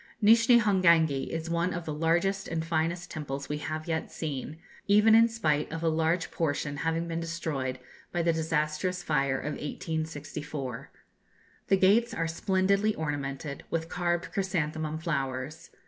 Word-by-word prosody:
Nishni 230 +3 +6
Hongangi 170 -9 +3
is 165 0 -3
one 170 +2 0
of 175 -1 -5
the 155 - -3
largest 175 +5 +1
and 165 -1 -2
finest 165 +2 -1
temples 140 -2 -5
we 150 0 -2
have 155 +1 -4
yet 160 -1 -2
seen, 150 -1 -4 0.3
even 210 +2 +6
in 230 +1 +7
spite 155 -12 0
of 165 +1 -4
a 165 - +3
large 160 +2 0
portion 145 -2 -1
having 165 +2 -1
been 165 0 -2
destroyed 160 -6 -3 0.3
by 175 - 0
the 165 0 +3
disastrous 160 +3 -1
fire 140 -3 +1
of 150 +3 -3
1864. 150 -4 -5 0.8
The 195 - +4
gates 205 +6 +4
are 165 - 0
splendidly 195 +5 +1
ornamented, 140 -2 -4
with 165 0 -2
carved 175 -1 -1
chrysanthemum 155 -5 -1
flowers. 140 -2 -3
165 Hz, 145 wpm, -29 LUFS, 150-180 Hz, 0.8 s, in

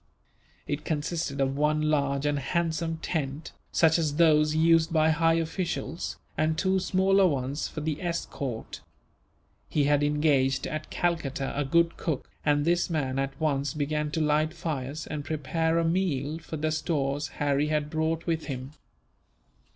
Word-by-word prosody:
It 145 +1 -3
consisted 155 -1 -2
of 135 0 +1
one 150 +1 +2
large 140 -2 +1
and 145 -1 +1
handsome 165 +2 -1
tent, 150 -2 -3 0.2
such 160 0 +4
as 150 -3 0
those 155 -2 +4
used 165 +1 +4
by 160 -1 +4
high 165 +1 +3
officials, 165 -2 -3 0.2
and 155 0 +1
two 190 +1 +2
smaller 190 +1 +3
ones 140 -1 -2
for 155 - -6
the 155 0 -2
escort. 145 -8 -4 0.9
He 150 - +2
had 145 0 +3
engaged 145 -3 +2
at 155 0 -4
Calcutta 150 -6 -1
a 145 - +1
good 170 +4 +2
cook, 155 -6 -3 0.2
and 145 0 +2
this 175 +2 +2
man 135 -5 -1
at 135 +2 -3
once 145 -3 0
began 150 0 -1
to 160 - 0
light 155 +1 +1
fires, 155 -3 -4
and 150 -2 -4
prepare 160 +3 0
a 165 - +2
meal 165 -4 0
from 160 -2 -7
the 155 0 +1
stores 145 -2 -1
Harry 145 0 +1
had 150 -1 -1
brought 160 +1 -1
with 165 -1 -1
him. 130 -1 -5
155 Hz, 155 wpm, -27 LUFS, 145-165 Hz, 0.9 s, such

